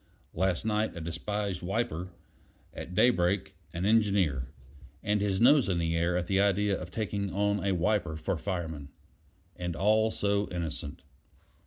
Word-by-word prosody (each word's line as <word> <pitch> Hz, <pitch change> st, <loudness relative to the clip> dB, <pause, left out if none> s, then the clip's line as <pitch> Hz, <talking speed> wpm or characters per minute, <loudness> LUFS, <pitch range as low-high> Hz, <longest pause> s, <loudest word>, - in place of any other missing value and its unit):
Last 95 Hz, +1 st, 0 dB
night 110 Hz, -1 st, 0 dB
a -, -, -5 dB
despised 95 Hz, +4 st, -3 dB
wiper; 90 Hz, -3 st, -2 dB, 0.6 s
at 90 Hz, -, -7 dB
daybreak, 95 Hz, -5 st, +2 dB, 0.2 s
an 85 Hz, +4 st, -3 dB
engineer; 100 Hz, -, +2 dB, 0.6 s
and 105 Hz, 0 st, +1 dB
his 100 Hz, -2 st, 0 dB
nose 130 Hz, -1 st, +5 dB
in 90 Hz, -, +1 dB
the 85 Hz, -1 st, 0 dB
air 85 Hz, +1 st, +1 dB
at 90 Hz, -, -1 dB
the 95 Hz, +1 st, +1 dB
idea 100 Hz, 0 st, +2 dB
of 90 Hz, -1 st, -6 dB
taking 100 Hz, -1 st, -3 dB
on 100 Hz, 0 st, 0 dB
a 100 Hz, -1 st, +1 dB
wiper 90 Hz, -2 st, 0 dB
for 95 Hz, +4 st, -2 dB
fireman. 80 Hz, -5 st, -4 dB, 0.7 s
And 90 Hz, -2 st, -4 dB
all 110 Hz, +4 st, +3 dB
so 100 Hz, -1 st, 0 dB
innocent. 80 Hz, -4 st, -5 dB
95 Hz, 150 wpm, -29 LUFS, 85-105 Hz, 0.7 s, nose